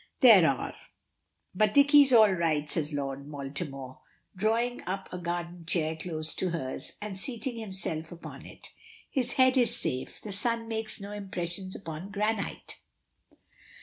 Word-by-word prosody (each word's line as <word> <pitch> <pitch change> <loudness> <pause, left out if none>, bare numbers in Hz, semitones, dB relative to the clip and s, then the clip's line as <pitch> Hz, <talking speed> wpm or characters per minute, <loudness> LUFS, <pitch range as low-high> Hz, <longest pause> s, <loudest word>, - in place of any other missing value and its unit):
"There 210 - +8
are. 135 - -3 0.8
But 210 +2 +1
Dicky's 285 -1 +7
all 220 -4 +7
right," 160 -5 0
says 155 -1 0
Lord 140 0 -5
Baltimore, 135 -2 -6 0.4
drawing 230 +5 0
up 190 +1 -4
a 180 - -5
garden 175 0 -5
chair 160 -2 0
close 160 -1 +3
to 185 - -1
hers, 135 -6 -4
and 210 -2 -5
seating 240 +2 0
himself 185 -6 -4
upon 170 - -10
it. - - -12 0.4
"His 255 -3 0
head 260 0 +4
is 245 -2 +5
safe. 130 0 -2
The 210 - -8
sun 230 +3 +1
makes 220 -1 0
no 200 0 -8
impression 190 -2 -4
upon 165 +1 -8
granite!" 210 +1 -3
185 Hz, 145 wpm, -28 LUFS, 160-220 Hz, 0.8 s, There